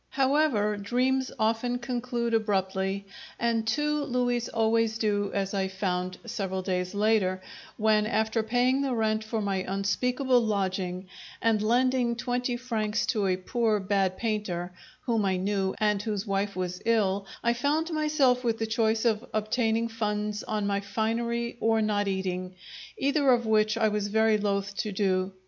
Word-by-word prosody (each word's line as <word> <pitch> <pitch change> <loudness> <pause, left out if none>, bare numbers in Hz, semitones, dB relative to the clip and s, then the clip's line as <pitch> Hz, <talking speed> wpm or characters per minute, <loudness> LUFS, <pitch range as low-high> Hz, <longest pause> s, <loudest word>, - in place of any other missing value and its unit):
However, 265 -7 +2
dreams 255 +5 0
often 230 +2 0
conclude 240 -1 -2
abruptly, 195 -2 0 0.3
and 230 -1 0
two 295 +5 +1
louis 245 -1 0
always 225 0 +1
do, 205 -2 0
as 195 0 -2
I 195 -1 0
found, 185 -1 -2
several 190 -4 -3
days 180 0 -2
later, 205 -3 +2 0.4
when, 215 -1 +3
after 220 0 +1
paying 245 +4 +2
the 270 -3 0
rent 220 -1 0
for 220 0 -3
my 200 -1 0
unspeakable 240 +7 +1
lodging 190 -4 -1 0.3
and 225 -2 +2
lending 245 +2 +2
twenty 245 0 -1
francs 225 -3 -1
to 210 -4 0
a 185 -1 +1
poor, 220 +2 0
bad 190 -1 0
painter, 205 -6 -2 0.3
whom 230 -4 0
I 190 -1 +1
knew 195 0 -1
and 210 -2 +2
whose 210 -2 -3
wife 200 0 -1
was 180 0 -3
ill, 200 -4 +1 0.2
I 235 - +3
found 295 +7 0
myself 300 -5 +2
with 230 -2 0
the 225 - -1
choice 220 0 +1
of 220 -2 +2
obtaining 225 +1 +1
funds 210 -2 -2
on 210 -1 -2
my 200 0 0
finery 235 +4 -2
or 225 0 +2
not 210 -1 +1
eating, 185 -1 -3 0.4
either 280 0 +3
of 240 -1 +2
which 215 0 +2
I 225 -1 +3
was 210 -1 -1
very 220 +1 +3
loath 200 -1 -1
to 215 - -2
do. 190 -1 0
220 Hz, 155 wpm, -28 LUFS, 200-235 Hz, 0.4 s, when